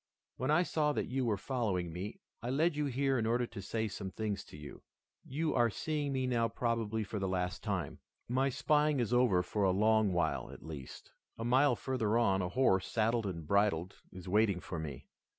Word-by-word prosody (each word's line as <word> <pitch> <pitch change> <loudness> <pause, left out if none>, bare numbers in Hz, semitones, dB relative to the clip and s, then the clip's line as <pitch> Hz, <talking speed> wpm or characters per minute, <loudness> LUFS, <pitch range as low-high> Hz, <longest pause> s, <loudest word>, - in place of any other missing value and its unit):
When 130 +3 -2
I 155 +4 +4
saw 150 -4 +1
that - - -1
you 130 0 0
were 110 -3 +1
following 95 -8 -2
me, 95 +5 -6 0.2
I 120 - -4
led 155 +5 +2
you 150 -1 0
here 135 0 +1
in 110 - 0
order 120 +2 +2
to 110 -3 -8
say 110 +3 -2
some 100 -1 -5
things 105 +1 -3
to - - -12
you. 75 -1 -10 0.4
You 155 +4 -1
are 120 -2 +3
seeing 150 +5 -2
me 130 -1 0
now 120 -2 +2
probably 115 -2 -1
for 105 +1 -4
the 95 - -1
last 90 -1 -2
time. - - -3 0.3
My 130 +3 +2
spying 150 +1 +2
is 120 0 0
over 120 -8 +4
for 105 +2 -1
a 95 - +4
long 105 +2 +3
while, 80 -5 0
at - - -11
least. 75 -5 -9 0.3
A 115 - -4
mile 130 +2 +4
further 115 -2 0
on, 95 -5 +3
a 90 - -2
horse, 95 -5 +2
saddled 115 -1 +1
and 85 -4 -5
bridled, 95 -1 +1
is 95 0 -10
waiting 100 -1 +3
for 85 -1 -6
me. 75 -5 -6
110 Hz, 205 wpm, -33 LUFS, 95-130 Hz, 0.4 s, I